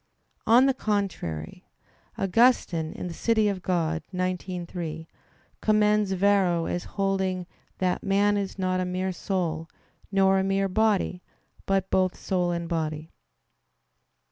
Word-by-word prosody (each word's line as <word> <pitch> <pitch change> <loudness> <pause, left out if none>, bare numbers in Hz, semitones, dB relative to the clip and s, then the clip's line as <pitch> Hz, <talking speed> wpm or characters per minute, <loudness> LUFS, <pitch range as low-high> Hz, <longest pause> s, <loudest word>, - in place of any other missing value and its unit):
On 240 +4 +7
the 270 - +3
contrary, 195 - -3 0.5
Augustine 195 -6 +2
(De 180 -2 -5
Civ. 230 +7 0
Dei 210 -2 +3 0.6
xix, 180 -1 -3
3) 160 -2 -5 0.5
commends 210 -1 +3
Varro 190 -3 +2
as 175 - -3
holding 190 -2 0 0.3
"that 185 -1 0
man 200 +1 +2
is 200 -1 -3
not 185 -1 0
a 185 - 0
mere 185 +1 -2
soul, 170 -3 -2 0.4
nor 195 -1 +4
a - - +1
mere 195 0 +1
body; 195 -2 +1 0.5
but 195 -1 0
both 185 -1 +2
soul 180 -2 -1
and 170 -1 -2
body." 160 -1 -3
190 Hz, 120 wpm, -26 LUFS, 175-200 Hz, 0.6 s, On